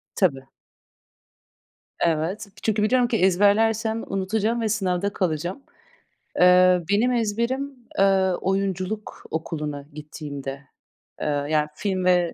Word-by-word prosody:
Tabii. 140 Hz, -9 st, +1 dB, 1.5 s
Evet. 170 Hz, +6 st, 0 dB, 0.2 s
Çünkü 215 Hz, -1 st, +1 dB
biliyorum 245 Hz, +2 st, +3 dB
ki 235 Hz, -, +1 dB
ezberlersem 220 Hz, +4 st, +2 dB
unutacağım 215 Hz, +4 st, -1 dB
ve 220 Hz, -, 0 dB
sınavda 200 Hz, -2 st, 0 dB
kalacağım. 175 Hz, -, -2 dB, 0.8 s
Eee, 180 Hz, 0 st, +6 dB
benim 215 Hz, +5 st, +3 dB
ezberim, 240 Hz, +4 st, -1 dB, 0.2 s
eee, 190 Hz, -1 st, +4 dB
oyunculuk 195 Hz, +2 st, -2 dB
okuluna 150 Hz, -3 st, -4 dB
gittiğimde, 145 Hz, -2 st, -7 dB, 0.6 s
eee, -, -, -1 dB, 0.2 s
yani 150 Hz, -1 st, +2 dB
film 190 Hz, -1 st, -2 dB
ve 180 Hz, -2 st, +3 dB
190 Hz, 100 wpm, -24 LUFS, 170-215 Hz, 1.5 s, Eee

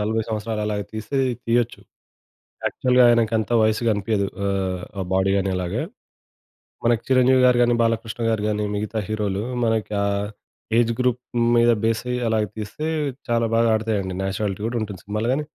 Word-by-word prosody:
40 110 Hz, +2 st, 0 dB
సంవత్సరాలు 110 Hz, 0 st, -3 dB
అలాగా 105 Hz, -1 st, -2 dB
తీస్తే 110 Hz, +5 st, -4 dB, 0.3 s
తీయొచ్చు. 120 Hz, 0 st, 0 dB, 0.9 s
యాక్చువల్‌గా 125 Hz, 0 st, +3 dB
ఆయనకంత 115 Hz, -2 st, +2 dB
వయస్సు 110 Hz, +1 st, +2 dB
కనిపియదు 105 Hz, -1 st, 0 dB, 0.2 s
ఆహ్, 95 Hz, -2 st, -1 dB, 0.2 s
ఆ -, -, 0 dB
బాడీ 95 Hz, +1 st, +2 dB
గానలాగా. 95 Hz, -2 st, -1 dB, 1.0 s
మనకి 120 Hz, -1 st, +3 dB
'చిరంజీవి 130 Hz, 0 st, +4 dB
గారు' 125 Hz, -1 st, +4 dB
గాని, 120 Hz, 0 st, +4 dB
'బాలకృష్ణ 115 Hz, 0 st, -1 dB
గారు' 110 Hz, -2 st, 0 dB
గాని 105 Hz, 0 st, -1 dB
మిగతా 105 Hz, +2 st, -2 dB
హీరోలు 105 Hz, -2 st, -2 dB, 0.2 s
మనకి 110 Hz, -1 st, 0 dB
ఆ -, -, +1 dB, 0.7 s
ఏజ్ 115 Hz, -1 st, +3 dB
గ్రూప్ 125 Hz, -1 st, +1 dB, 0.3 s
మీద 120 Hz, 0 st, +5 dB
బెసయ్యి 115 Hz, +2 st, 0 dB
అలాగా 110 Hz, -1 st, +1 dB
తీస్తే 110 Hz, +8 st, -5 dB, 0.4 s
చాలా 115 Hz, 0 st, +2 dB
బాగా 115 Hz, 0 st, +3 dB
ఆడతాయండి. 105 Hz, -4 st, -1 dB
నేచురాలిటీ 95 Hz, +1 st, -2 dB
గూడుంటుంది 110 Hz, -5 st, -3 dB
సినిమాలు 105 Hz, +3 st, -2 dB
గానీ, 150 Hz, +3 st, -1 dB
110 Hz, 145 wpm, -23 LUFS, 105-115 Hz, 1.0 s, మీద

